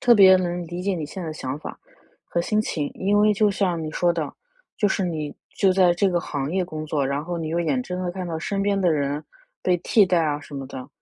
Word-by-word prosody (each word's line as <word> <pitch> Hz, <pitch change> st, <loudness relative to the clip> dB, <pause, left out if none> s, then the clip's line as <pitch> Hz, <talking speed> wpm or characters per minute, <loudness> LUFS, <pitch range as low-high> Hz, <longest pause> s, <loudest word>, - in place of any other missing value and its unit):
特 240 Hz, -1 st, +6 dB
别 190 Hz, -2 st, +8 dB
能 175 Hz, -1 st, -2 dB
理 175 Hz, +2 st, -5 dB
解 195 Hz, 0 st, 0 dB
你 165 Hz, -4 st, -3 dB
现 180 Hz, +6 st, -7 dB
在 -, -, -5 dB
的 -, -, -4 dB
想 135 Hz, -2 st, -4 dB
法 -, -, -6 dB
儿 -, -, -16 dB, 0.5 s
和 170 Hz, -, -1 dB
心 215 Hz, +5 st, +1 dB
情。 150 Hz, -8 st, -2 dB
因 200 Hz, +2 st, +1 dB
为 210 Hz, 0 st, +5 dB
就 210 Hz, 0 st, +3 dB
像 180 Hz, -4 st, 0 dB
你 155 Hz, -, -4 dB
说 175 Hz, +2 st, +2 dB
的， 160 Hz, -4 st, -3 dB, 0.4 s
就 205 Hz, -, +2 dB
是 195 Hz, -, 0 dB
你 155 Hz, -4 st, -3 dB, 0.2 s
就 190 Hz, -1 st, +4 dB
在 185 Hz, -2 st, +5 dB
这 195 Hz, +3 st, +2 dB
个 175 Hz, -2 st, +1 dB
行 145 Hz, -3 st, -3 dB
业 185 Hz, +1 st, 0 dB
工 155 Hz, -3 st, -6 dB
作， 145 Hz, -3 st, 0 dB
然 140 Hz, +2 st, -1 dB
后 175 Hz, +1 st, -3 dB
你 160 Hz, -1 st, -3 dB
又 170 Hz, +2 st, 0 dB
眼 250 Hz, +10 st, 0 dB
睁 180 Hz, -5 st, -4 dB
地 180 Hz, -, -1 dB
看 185 Hz, 0 st, -5 dB
到 165 Hz, -2 st, -3 dB
身 195 Hz, +4 st, -2 dB
边 200 Hz, -1 st, +1 dB
的 180 Hz, -2 st, +3 dB
人 145 Hz, 0 st, -1 dB, 0.4 s
被 180 Hz, -1 st, +3 dB
替 205 Hz, +3 st, +4 dB
代 180 Hz, -2 st, +3 dB
啊 150 Hz, -1 st, -1 dB
什 145 Hz, -, -11 dB
么 135 Hz, -1 st, -5 dB
的， 130 Hz, -1 st, -8 dB
175 Hz, 290 characters per minute, -24 LUFS, 155-190 Hz, 0.5 s, 别